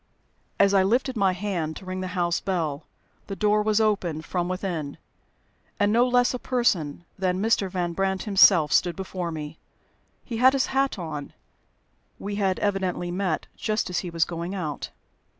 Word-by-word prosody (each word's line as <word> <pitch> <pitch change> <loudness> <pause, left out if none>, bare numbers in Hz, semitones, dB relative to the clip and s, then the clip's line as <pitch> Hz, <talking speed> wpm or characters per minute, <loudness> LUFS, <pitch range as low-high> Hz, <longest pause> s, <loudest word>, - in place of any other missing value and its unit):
As 200 0 +5
I 195 - +5
lifted 245 +7 +1
my 195 -3 +3
hand 180 -5 -3
to 190 - -10
ring 185 0 -4
the 185 - -3
house 175 -1 +1
bell, 160 -6 -2 0.4
the 200 - -4
door 210 +2 +2
was 215 0 +2
opened 185 -8 0
from 175 +1 -2
within, 175 -6 -3 0.8
and 205 0 +3
no 240 +2 +4
less 245 0 +3
a 250 - -3
person 175 - 0
than 185 -1 0
Mr. 210 -2 +1
Van 175 -2 -2
Brandt 190 +1 -1
himself 180 -6 +5
stood 175 -2 +3
before 185 -2 -4
me. 155 -1 -6 0.7
He 230 - -4
had 260 +3 +6
his 270 -1 +2
hat 270 -3 +1
on. 155 -5 -6 0.8
We 200 +1 -5
had 195 -2 +1
evidently 190 -3 -1
met 180 -3 -1
just 215 -3 -1
as 180 - 0
he 180 - -5
was 165 -1 +1
going 170 +3 -5
out. 155 -6 -4
190 Hz, 170 wpm, -25 LUFS, 170-210 Hz, 0.8 s, had